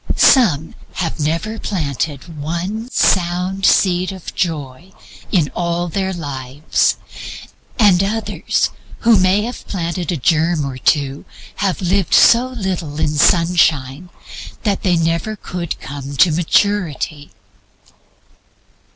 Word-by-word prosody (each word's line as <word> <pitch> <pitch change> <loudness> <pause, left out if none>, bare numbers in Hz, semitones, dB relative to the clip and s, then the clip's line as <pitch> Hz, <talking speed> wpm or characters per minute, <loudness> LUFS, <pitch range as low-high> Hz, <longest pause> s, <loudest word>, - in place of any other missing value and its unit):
Some 170 - +4 0.2
have 170 -2 -3
never 165 +9 -2
planted 150 -2 -4
one 180 +10 -4
sound 185 -1 +1
seed 185 0 +3
of 190 -3 -9
Joy 160 0 -4 0.4
in 165 -7 +1
all 175 0 -1
their 190 +2 -2
lives; 145 -4 -1 0.8
and 195 -5 +5
others 220 +3 -1 0.3
who 230 -3 +5
may 185 +3 +3
have 240 +2 -7
planted 175 -2 -3
a 170 - -1
germ 160 +2 +1
or 130 -2 -6
two 140 0 +1 0.3
have 195 -1 -1
lived 185 0 +2
so 240 +2 +6
little 185 - -4
in - - +1
sunshine 160 -1 +2 0.5
that 205 -3 0
they 180 -2 +2
never 165 +6 -1
could 180 -4 -5
come 140 0 -7
to 175 - +5
maturity. 165 -3 0
175 Hz, 115 wpm, -18 LUFS, 150-190 Hz, 0.8 s, so